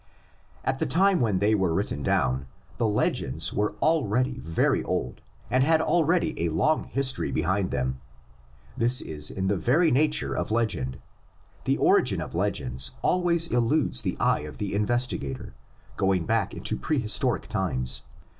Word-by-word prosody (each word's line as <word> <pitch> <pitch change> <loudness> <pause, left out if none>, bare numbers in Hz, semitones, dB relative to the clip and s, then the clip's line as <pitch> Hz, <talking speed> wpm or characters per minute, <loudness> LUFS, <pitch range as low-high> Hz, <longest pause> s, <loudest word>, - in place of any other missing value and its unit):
AT - - -1
the - - 0
time 190 +2 +3
when 110 -6 +1
they 100 +3 +2
were 95 -5 +1
written 100 -7 -2
down 65 0 0 0.3
the 115 - +1
legends 80 -7 0
were 105 0 0
already 130 -4 +1
very 80 0 0
old 65 - -3 0.3
and 130 +1 +3
had 160 +2 +3
already 170 +1 +1
a 85 - +1
long 150 - +1
history 135 -2 0
behind 95 +2 0
them. 65 0 -2 0.7
This 120 +2 +4
is 75 -1 -1
in 95 0 -3
the 100 0 +1
very 150 - +2
nature 150 +4 +1
of - - -2
legend: 105 - -1 0.7
the - - +1
origin - - +3
of - - -6
legends 65 +1 -1
always 170 -2 +2
eludes 120 - +2
the - - -3
eye - - +2
of 75 0 -9
the 100 -2 -4
investigator, 105 - -1 0.4
going 95 -3 +1
back 110 -1 0
into - - -2
prehistoric 120 -9 0
times. 65 +1 -2
105 Hz, 150 wpm, -26 LUFS, -, 0.7 s, This